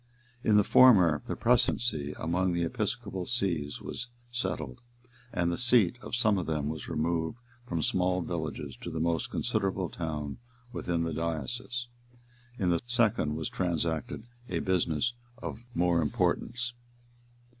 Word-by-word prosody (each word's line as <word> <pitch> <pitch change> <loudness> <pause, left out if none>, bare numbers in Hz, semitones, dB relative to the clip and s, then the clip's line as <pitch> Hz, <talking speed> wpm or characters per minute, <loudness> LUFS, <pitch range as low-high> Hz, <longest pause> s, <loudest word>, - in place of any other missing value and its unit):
In 105 -1 +5
the 105 - +6
former, 95 - +6
the - - -2
precedency 115 -10 +1
among 90 +2 0
the 85 0 +1
episcopasees 95 -5 -1
was 125 - -5 0.2
settled, 75 - -3 0.5
and 85 -1 +1
the 85 - -1
seat 120 -3 +5
of - - -4
some 110 -5 +3
of 90 - -4
them 75 -2 -1
was 80 0 -5
removed 80 +4 -1 0.3
from 85 -3 -1
small 90 +1 +2
villages 80 -5 -4
to - - -6
the 80 -1 -3
most 85 0 0
considerable 95 -6 0
town 75 -4 -4 0.3
within 85 -6 -1
the 80 -1 -2
diocese. 120 - -2 0.7
In 95 -5 +1
the 85 - +2
second 110 -11 +2
was 80 -1 -2
transacted 85 0 -1 0.3
a - - -1
business 90 +2 +1 0.2
of 115 - -6 0.2
more 85 -1 +3
importance. 120 - 0
85 Hz, 135 wpm, -30 LUFS, 80-110 Hz, 0.7 s, the